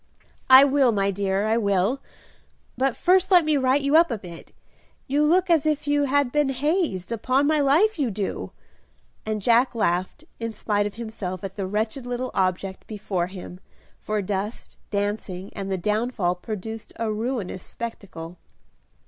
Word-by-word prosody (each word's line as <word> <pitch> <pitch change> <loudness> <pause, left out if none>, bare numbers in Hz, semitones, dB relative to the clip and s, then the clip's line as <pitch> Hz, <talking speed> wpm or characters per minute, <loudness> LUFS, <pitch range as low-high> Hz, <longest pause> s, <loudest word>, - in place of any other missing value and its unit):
"I 260 +1 +10
will, 275 -3 +4
my 200 -2 +1
dear, 195 +1 -1
I 220 +1 +2
will; 200 +4 +1 0.7
but 265 -1 0
first 370 +1 +3
let 355 -4 +6
me 310 -1 +2
right 265 0 +3
you 280 +2 +2
up 335 +1 +6
a 230 - -2
bit; 175 -4 -11 0.5
you 285 +3 +1
look 355 +5 +3
as 330 -4 +3
if 305 -2 0
you 290 0 +2
had 280 -1 +1
been 295 -1 +2
hazed, 270 - -1
upon 255 +5 +1
my 305 +1 +2
life 325 +9 +3
you 270 -4 +1
do;" 205 -1 -4 0.8
and 215 -2 -2
Jack 240 +2 +3
laughed 185 - -1 0.2
in 230 -1 -4
spite 205 -1 0
of 205 - -9
himself 205 -5 -6
at 195 -1 -6
the 195 -2 -3
wretched 220 +5 -2
little 245 +1 -3
object 190 0 -1
before 195 -4 -2
him, 180 -1 -9 0.4
for 215 -1 -2
dust, 200 +3 -4
dancing, 200 -2 -3
and 195 -1 -5
the 190 - 0
downfall 210 -1 0
produced 215 +4 -7
a 225 -1 -2
ruinous 220 -4 -3
spectacle. 180 -7 -8
225 Hz, 165 wpm, -24 LUFS, 195-275 Hz, 0.8 s, I